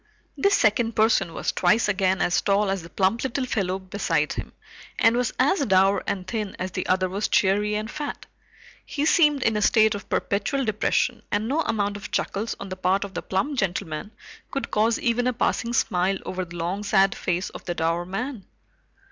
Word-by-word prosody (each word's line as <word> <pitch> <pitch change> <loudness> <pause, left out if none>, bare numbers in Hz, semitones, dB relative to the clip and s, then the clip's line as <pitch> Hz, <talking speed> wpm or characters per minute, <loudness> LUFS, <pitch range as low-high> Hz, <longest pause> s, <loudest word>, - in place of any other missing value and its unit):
This 400 0 +3
second 225 +1 +2
person 215 -5 +3
was - - -2
twice 210 +6 +2
again 190 -2 +1
as 175 - +2
tall 200 0 +2
as 195 -1 -2
the 165 - -11
plump 190 +6 +1
little 265 0 -1
fellow 190 -6 -1
beside 185 -5 -1
him, - - -6 0.5
and 225 +1 +4
was 245 -1 0
as 285 +5 +2
dour 195 0 +3
and 185 -2 -2
thin 210 0 -4
as 185 +1 -4
the 185 - -3
other 185 0 +2
was 195 +3 -2
cheery 205 +2 +2
and 215 +1 -2
fat. 300 -1 -5 0.6
He 290 0 -2
seemed 295 -4 +4
in 225 - +2
a 210 - 0
state 220 +1 +4
of 205 - -7
perpetual 210 +7 0
depression, 220 - 0
and 210 +2 0
no 285 +6 0
amount 205 -7 -1
of 205 - -8
chuckles 210 +4 -2
on 200 - -7
the 185 - -6
part 185 +2 +1
of 200 -1 -8
the - - -3
plump 265 +9 -1
gentleman 180 -2 -2 0.4
could 275 - -4
cause 220 +2 +2
even 240 +1 0
a 250 - +1
passing 235 0 0
smile 195 -4 +1
over 185 0 -3
the 175 0 -11
long 180 +5 -2
sad 195 -1 +3
face 180 +1 -2
of - - -10
the 175 - -3
dour 165 +1 0
man. 200 +4 -5
205 Hz, 200 wpm, -24 LUFS, 185-230 Hz, 0.6 s, and